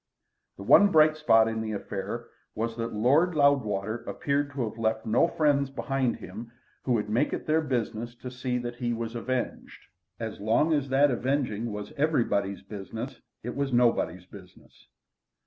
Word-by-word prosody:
The 100 - -8
one 200 - +6
bright 155 -1 +5
spot 115 -8 +4
in 110 0 -2
the 110 -1 -3
affair 105 +3 -5 0.3
was 115 +1 -2
that 115 0 -3
Lord 145 +11 +3
Loudwater 115 -8 +2
appeared 140 0 -1
to 130 -4 -2
have 110 +2 -8
left 110 0 0
no 115 +9 +3
friends 145 -4 +1
behind 135 -2 -1
him 110 +6 -9 0.3
who 125 - 0
would 105 -3 0
make 115 +7 +1
it - - -4
their 155 +1 +2
business 120 -4 -3
to 125 +1 -8
see 125 0 -2
that 120 0 -5
he 120 -1 -1
was 115 0 -4
avenged. 125 +1 -4 0.4
As 110 -1 -5
long 115 +10 +2
as 145 -3 0
that 140 +2 +4
avenging 120 -3 -1
was 105 0 -6
everybody's 115 -10 0
business 115 +5 -7 0.2
it 120 +2 -5
was 140 -1 -1
nobody's 115 -8 +2
business. 95 -1 -16
120 Hz, 165 wpm, -27 LUFS, 110-140 Hz, 0.4 s, one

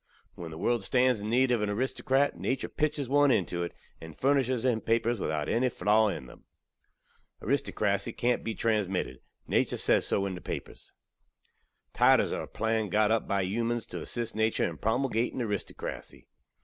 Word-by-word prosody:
When 85 -2 -8
the 80 - -8
world 120 +4 0
stands 125 +1 +2
in 105 +1 -4
need 125 +2 +3
ov 120 -3 +2
an 105 - 0
aristokrat, 130 +5 +1
natur 130 0 -2
pitches 150 -3 -1
one 145 +2 +4
into 90 -7 +1
it, 85 - -3 0.3
and 80 -2 -10
furnishes 130 -3 +2
him 120 -4 +2
papers 115 0 +1
without 75 -4 -2
enny 125 +2 +2
flaw 110 -1 +3
in 75 -10 -3
them. 65 - -15 0.9
Aristokrasy 105 -6 0
kant 120 0 +1
be 115 - -3
transmitted 105 -5 -1 0.3
natur - - +1
sez - - +2
so 100 - +1
in 95 - -3
the 90 - -7
papers. - - -7 1.0
Titles - - +4
are - - -2
a - - -7
plan 110 -1 -1
got 105 +2 +3
up 115 -1 +1
bi 100 -1 +1
humans 115 +4 -1
tew - - -6
assist 120 -3 -4
natur 110 0 +1
in 85 - -7
promulgating 120 +1 0
aristokrasy. 105 -5 -5
110 Hz, 170 wpm, -29 LUFS, 100-125 Hz, 1.0 s, one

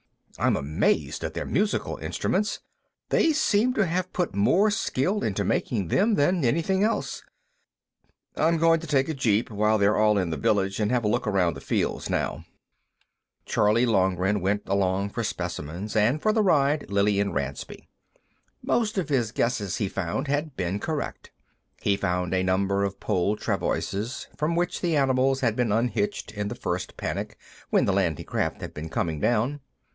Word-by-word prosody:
I'm - - +3
amazed 75 +3 0
at - - -4
their - - -3
musical 205 +2 0
instruments; 210 +3 -1 0.5
they 325 - +3
seem 250 -4 +2
to 215 - +3
have 185 +2 -2
put 180 - -1
more 185 - +3
skill 200 0 0
into 105 - -1
making 100 -8 -1
them 210 - +3
than 170 +2 +2
anything 170 +10 +1
else. 225 +2 -1 1.1
I'm 165 +1 +2
going 165 0 +4
to 165 - -8
take 140 -1 +2
a - - 0
jeep, 115 -5 +1
while 105 +1 +2
they're 100 +1 +3
all 105 -1 +4
in 90 -4 0
the 80 - -2
village, 95 +5 +1
and 105 -1 +1
have 125 -1 +1
a - - +1
look 120 +2 0
around 95 -4 +2
the - - -9
fields, - - -1
now." - - -2 1.0
Charley 110 +4 +3
Loughran 95 -2 +2
went 100 +3 0
along 95 0 0
for 115 - -3
specimens, 85 0 -4
and, 115 +7 +3
for 215 +6 +2
the 220 - +3
ride, 150 -6 +2
Lillian 100 0 +2
Ransby. 70 -1 -5 0.8
Most 215 -3 0
of 180 -6 -1
his 120 -6 +1
guesses, 110 -6 -1
he 100 - 0
found, 95 - -3
had 145 0 -1
been 95 +2 -1
correct. 155 +5 -4 0.5
He 100 - +2
found 90 -2 -1
a 95 - +2
number 95 +2 +1
of 100 -1 -3
pole 100 0 0
travoises, 110 +6 -2
from 155 +3 -1
which 175 +1 -1
the 170 -3 +1
animals 135 -1 +2
had 115 -4 +1
been 120 -3 0
unhitched 110 -3 -1
in 105 -1 -3
the 115 - -5
first 90 -3 -4
panic - - -4 0.3
when - - +3
the 100 - +1
landing 90 -6 0
craft - - -2
had - - -6
been 80 +2 -6
coming 80 -2 -2
down. 120 - +1
110 Hz, 170 wpm, -26 LUFS, 100-150 Hz, 1.1 s, going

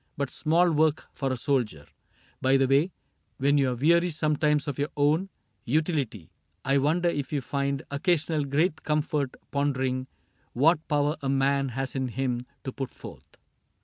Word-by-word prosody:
But 140 -2 -2
small 170 +3 +3
work 155 0 +2
for 135 -2 -2
a 130 - -1
soldier. 115 - -1 0.6
By 135 +1 +4
the 135 -1 +3
way. 140 +7 +3 0.5
When 145 +1 +3
you 135 -2 +3
are 125 - -1
weary 170 +7 +3
sometimes 150 -1 +1
of 145 -1 -3
your 145 +2 0
own 155 +7 +2 0.3
Utility, 140 - -1 0.3
I 135 +1 +3
wonder 165 +5 +2
if 145 -5 -2
you 145 - 0
find 140 +1 -2
Occasional 155 0 +1
great 155 +4 +1
comfort 150 -3 -1 0.2
pondering 130 -2 0 0.5
What 155 +5 +3
power 150 +1 +1
a 135 - -2
man 135 0 +2
has 135 -1 -2
in 130 -1 -1
him 125 0 -2 0.2
to 130 - -4
put 135 -1 -5
forth - - -13
140 Hz, 160 wpm, -27 LUFS, 135-155 Hz, 0.6 s, By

